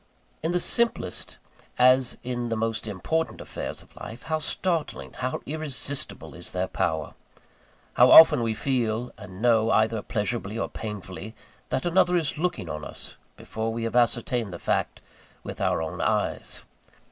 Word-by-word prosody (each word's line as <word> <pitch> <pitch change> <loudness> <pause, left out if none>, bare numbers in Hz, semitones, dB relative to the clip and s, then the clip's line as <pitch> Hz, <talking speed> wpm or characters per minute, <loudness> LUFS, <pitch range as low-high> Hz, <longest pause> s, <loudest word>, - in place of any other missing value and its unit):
In 160 - 0
the 180 - +2
simplest, 235 - 0 0.4
as 130 0 +5
in 120 -1 -3
the 115 - 0
most 115 0 -1
important 135 - -2
affairs - - -5
of - - -24
life, 115 +3 -9
how 160 -1 -1
startling, 165 +1 -2
how 130 0 -3
irresistible 145 -2 -3
is - - -9
their - - 0
power! 80 -2 -1 0.8
How - - +6
often 160 -6 +10
we 115 -1 0
feel 120 -2 -1
and 105 -1 -10
know, 115 -2 +4
either 110 0 +2
pleasurably 105 0 -2
or - - -2
painfully, 105 0 -7 0.3
that 130 - -1
another 180 0 +4
is 155 -2 -1
looking 175 - -1
on 75 -1 -5
us, - - -6 0.2
before 110 +1 -3
we 115 0 -3
have 115 +1 -2
ascertained 120 -2 +1
the 85 - -6
fact - - -1 0.4
with - - -7
our 80 - +1
own 80 - -4
eyes! - - -1
120 Hz, 155 wpm, -26 LUFS, 110-145 Hz, 0.8 s, often